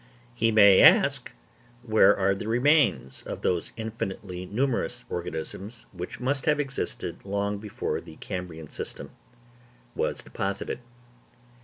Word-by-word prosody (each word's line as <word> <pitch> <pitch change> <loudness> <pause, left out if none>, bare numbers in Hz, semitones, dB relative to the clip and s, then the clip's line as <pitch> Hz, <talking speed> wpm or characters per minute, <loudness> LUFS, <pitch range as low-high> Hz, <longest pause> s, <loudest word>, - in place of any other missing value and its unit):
He 115 - +2
may 100 -3 +7
ask - - +5 0.5
where 110 -3 +5
are 100 0 +2
the 100 +2 -5
remains 120 - +2
of - - -7
those 90 -2 0
infinitely 95 -5 -5
numerous 125 +5 -1
organisms 90 +6 -6
which 90 -1 -7
must 135 +3 -1
have 150 -1 +3
existed 135 -2 -4
long 100 +1 -2
before 105 -1 -3
the 80 -2 -13
Cambrian 90 -5 -6
system - - -7 0.8
was - - -2
deposited? 100 +3 -4
100 Hz, 120 wpm, -27 LUFS, 90-115 Hz, 0.8 s, may